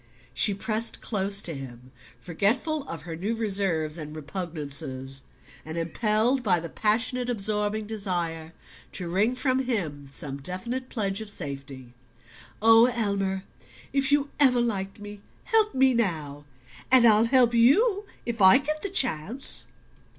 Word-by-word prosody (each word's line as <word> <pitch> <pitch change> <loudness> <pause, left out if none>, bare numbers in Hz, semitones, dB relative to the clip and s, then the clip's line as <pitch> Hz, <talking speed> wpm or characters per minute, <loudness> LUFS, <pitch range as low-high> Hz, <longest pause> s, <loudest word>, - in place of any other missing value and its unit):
She 205 - +3
pressed 220 +3 0
close 200 -2 +1
to 170 - -3
him, 130 -2 -10 0.3
forgetful 255 - -1
of - - -7
her 165 -2 -6
new 200 +7 -3
reserves 190 -8 -1
and 150 0 -8
repugnances, 145 -5 -3 0.4
and 160 +1 -7
impelled 215 +9 0
by 190 -7 +2
the 165 0 -7
passionate 245 +5 0
absorbing 210 -1 -1
desire 175 -6 -3 0.4
to 180 - -5
wring 205 +8 +1
from 255 0 0
him 160 - -3
some 140 0 -3
definite 235 - -4
pledge 200 -3 -2
of 220 - -2
safety. 135 -7 -3 0.7
"Oh, 225 +1 +7
Elmer, 200 -5 -1 0.5
if 275 0 +1
you 285 -1 +1
ever 255 -4 +4
liked 195 -4 -2
me, 205 -1 -10 0.2
help 445 -3 +3
me 260 0 +4
now, 155 -10 -2 0.5
and 255 -2 +7
I'll 220 0 +6
help 245 -1 +3
you 395 - +3 0.2
if 230 -3 -4
I 190 +5 +8
get 305 +2 -3
the 400 - -3
chance!" 250 - +1
205 Hz, 140 wpm, -26 LUFS, 165-245 Hz, 0.7 s, I